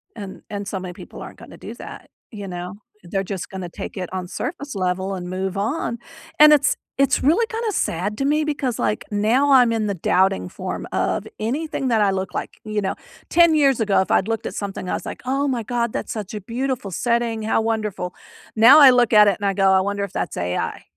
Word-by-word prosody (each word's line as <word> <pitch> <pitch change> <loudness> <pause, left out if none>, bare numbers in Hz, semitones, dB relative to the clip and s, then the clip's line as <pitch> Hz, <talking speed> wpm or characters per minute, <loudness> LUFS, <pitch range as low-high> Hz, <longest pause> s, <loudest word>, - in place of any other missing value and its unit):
And 200 -3 -8
and 200 -1 -5
so 195 -3 -3
many 180 -1 -7
people - - -11
aren't - - -10
gonna - - -12
do - - -8
that, - - -10 0.2
you 205 -2 -7
know. 180 0 -6 0.3
They're 195 +3 -2
just 190 -1 -5
gonna 190 -2 -6
take 170 - -8
it 180 -2 -4
on 185 -1 -4
surface 280 - -5
level 185 +1 -1
and 180 -1 -6
move 190 +1 -3
on, 235 +4 -2 0.4
and 300 0 +9
it's 285 -2 +3 0.2
it's 275 0 +2
really 335 - +4
kinda 450 -1 -2
sad 205 - -1
to 275 - 0
me 300 +2 +2
because, 280 -5 -2
like, 210 - -1
now 230 +8 +2
I'm 250 -3 +6
in 220 -2 0
the 200 - -1
doubting 165 - +1
form - - -5
of - - -1
anything 275 +5 -2
that 225 -3 +2
I 200 - +3
look 190 0 -3
like, - - -5
you 215 -1 -2
know, 190 - -2 0.3
10 340 -2 +5
years 275 -5 +3
ago, 205 -3 +3
if - - -3
I'd 190 - +3
looked 225 -1 -2
at - - -4
something, 195 -2 -5
I - - -1
was - - -4
like, - - -7
"Oh 275 +2 0
my 250 -4 -1
god. 235 0 -2
That's - - -4
such 210 -3 -6
a 210 - -5
beautiful 235 0 -3
setting. 235 +1 0
How 220 - +1
wonderful." 215 -5 -2 0.4
Now 240 +7 +8
I 280 - +10
look 245 -2 +3
at 210 -1 +8
it, 200 - +2
and 205 - -3
I 195 - +1
go, 195 0 +3
"I 190 0 +4
wonder 200 +1 -2
if 200 - -5
that's - - -3
AI." 90 +1 -3
215 Hz, 230 wpm, -22 LUFS, 190-255 Hz, 0.4 s, I